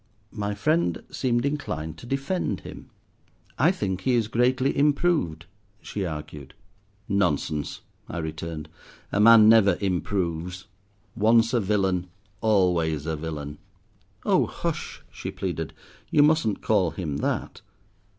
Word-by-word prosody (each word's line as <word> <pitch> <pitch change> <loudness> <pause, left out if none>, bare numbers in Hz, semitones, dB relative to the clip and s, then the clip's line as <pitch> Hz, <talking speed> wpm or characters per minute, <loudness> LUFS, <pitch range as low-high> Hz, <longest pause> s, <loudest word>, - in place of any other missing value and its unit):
My 105 -1 -3
friend 155 - +1
seemed 120 -1 0
inclined 80 - -3
to 120 - -11
defend 135 - -2
him. - - -10 0.7
"I - - +5
think 95 -2 -3
he 130 -2 +2
is 115 -3 +1
greatly 125 +4 +1
improved," 145 - +1 0.3
she 100 -3 -4
argued. 75 -3 -8 0.5
"Nonsense!" 85 -7 0 0.3
I - - -5
returned, 80 -1 -5 0.4
"a 105 - 0
man 110 0 +8
never 110 -3 +6
improves. 90 -2 -2 0.5
Once 115 +2 +4
a 120 - +3
villain, 95 -3 0 0.3
always 90 -8 +2
a 80 -1 -1
villain." 75 -2 -6 0.7
"Oh, - - +3
hush!" - - -4
she - - -6
pleaded, 85 -5 -4 0.4
"you 145 - +5
mustn't 150 -9 +2
call 100 -5 +3
him 80 -5 -4
that." - - -2
100 Hz, 120 wpm, -25 LUFS, 80-115 Hz, 0.7 s, man